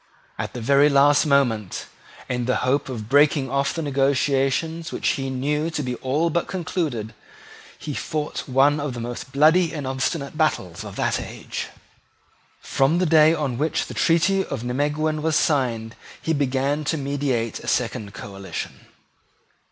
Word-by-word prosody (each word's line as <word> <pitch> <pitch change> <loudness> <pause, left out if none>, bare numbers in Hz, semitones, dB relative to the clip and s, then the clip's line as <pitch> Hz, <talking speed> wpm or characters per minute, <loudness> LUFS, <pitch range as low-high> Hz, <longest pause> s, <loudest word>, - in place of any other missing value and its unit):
At - - -4
the 125 - -5
very 140 +5 +5
last 145 +2 +4
moment, 120 -8 +1 0.4
in 125 -1 -2
the 125 - +1
hope 135 +2 +1
of 110 -5 -5
breaking 145 0 +3
off 140 0 +1
the 165 - -2
negotiation 140 +3 +1
which - - -1
he 135 -1 -1
knew 150 +5 -1
to 155 -3 -3
be 125 -1 -2
all 150 +6 0
but 170 +2 0
concluded, 155 - -3 0.6
he 150 - -6
fought 150 0 -4
one 140 +3 +4
of 145 -3 -3
the - - -5
most 120 +2 -6
bloody 160 +5 +4
and 145 -4 -5
obstinate 135 +3 -2
battles 95 - -1
of - - -9
that - - 0
age. - - -6 0.9
From 135 +5 +1
the 180 - +2
day 155 -1 +6
on 135 -6 -2
which 155 +2 0
the - - -8
treaty 190 +4 +2
of 135 -9 -5
Nimeguen 150 +5 -1
was 160 0 +1
signed, 120 -8 0 0.2
he 160 - -1
began 140 +1 0
to 160 - 0
meditate 135 -5 -1
a - - -11
second 105 -2 -1
coalition. 100 -1 -7
140 Hz, 160 wpm, -23 LUFS, 130-155 Hz, 0.9 s, day